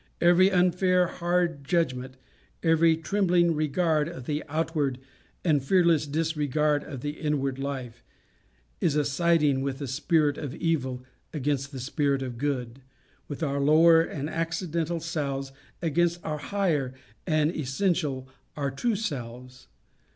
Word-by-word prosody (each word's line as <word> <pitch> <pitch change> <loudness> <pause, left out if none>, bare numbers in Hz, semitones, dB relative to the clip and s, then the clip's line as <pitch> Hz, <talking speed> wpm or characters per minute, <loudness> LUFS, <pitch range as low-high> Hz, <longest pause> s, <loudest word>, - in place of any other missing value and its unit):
every 175 +2 +5
unfair 180 0 +3
hard 175 -3 -1
judgment, 130 -5 -1 0.5
every 165 -1 +4
trembling 175 0 +2
regard 155 0 +1
of 165 -8 -9
the 150 +2 -2
outward 155 -4 -1 0.5
and 150 -5 +3
fearless 170 -1 +3
disregard 150 -1 0
of 135 -5 -8
the 145 - -2
inward 140 -3 -1
life, 130 -4 -5 0.8
is 150 - +1
a 150 -1 +2
siding 150 -2 +2
with 135 -1 -2
the 140 -1 -5
spirit 150 +2 +1
of 145 -4 -5
evil 130 -7 -1 0.3
against 140 -2 -1
the 135 - -7
spirit 140 +1 0
of 125 -3 -6
good, 130 -3 -3 0.5
with 145 +2 -5
our 140 -2 0
lower 160 +3 +6
and 150 -3 -4
accidental 165 0 -2
selves, 140 -5 -3 0.3
against 170 +2 +1
our 150 -1 -2
higher 150 -8 -1 0.3
and 155 0 +2
essential 145 -2 -1 0.3
our 140 -2 -1
true 225 - 0
selves. 125 - -6
150 Hz, 130 wpm, -27 LUFS, 135-170 Hz, 0.8 s, lower